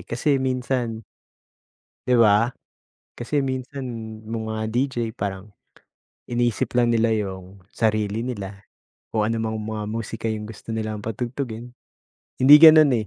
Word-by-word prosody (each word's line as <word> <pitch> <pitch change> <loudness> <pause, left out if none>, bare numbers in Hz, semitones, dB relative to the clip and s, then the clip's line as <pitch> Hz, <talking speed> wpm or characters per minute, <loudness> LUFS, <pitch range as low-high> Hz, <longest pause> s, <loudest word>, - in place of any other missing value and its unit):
kasi 135 +3 +1
minsan 125 -3 -2 1.0
'Di 125 - +3
ba. 110 +3 +4 0.6
Kasi 135 +4 -1
minsan 130 +1 -4 0.4
no'ng 110 0 -4
mga 110 0 -3
DJ 130 +2 0 0.2
parang, 100 0 -5 0.7
inisip 120 -1 -1
lang 120 -1 +3
nila 115 -1 +2
'yong 95 -3 -4
sarili 110 0 -1
nila. 100 -5 -6 0.5
O 110 - +2
anumang 110 0 -1
mga 110 -1 -4
musika 115 +1 -4
'yong 110 -1 -3
gusto 110 +1 -7
nilang 110 -1 -3
patugtugin. 120 +2 -5 0.7
Hindi 135 +3 +8
gano'n 155 -2 +9
eh. - - -10
115 Hz, 125 wpm, -23 LUFS, 105-125 Hz, 1.0 s, gano'n